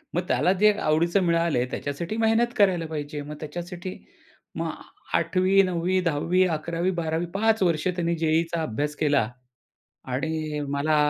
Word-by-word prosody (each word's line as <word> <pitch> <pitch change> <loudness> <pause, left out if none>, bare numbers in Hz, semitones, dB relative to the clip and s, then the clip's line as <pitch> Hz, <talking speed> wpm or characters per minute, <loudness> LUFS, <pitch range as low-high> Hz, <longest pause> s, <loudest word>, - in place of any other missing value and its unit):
मग 175 - +2
त्याला 180 - +2
जे 210 - +7
आवडीचं 170 +5 +2
मिळालं, 170 -6 +2
त्याच्यासाठी 165 +9 -4
मेहनत 225 +2 +2
करायला 185 -5 +3
पाहिजे. 150 -1 -5
मग 150 +1 -7
त्याच्यासाठी 175 +4 -6 0.6
मग - - -2 0.4
8वी 190 +1 +3
9वी 185 0 0
10वी 175 +2 +2
11वी 170 +4 -1
12वी 160 +1 -1
5 220 +1 +2
वर्ष 170 -1 +1
त्याने 175 -1 0
जे-ई-ईचा 165 +1 +1
अभ्यास 150 +3 -2
केला 145 -7 +2 0.8
आणि 155 +2 -2
मला 145 +2 +1
170 Hz, 135 wpm, -25 LUFS, 155-185 Hz, 0.8 s, जे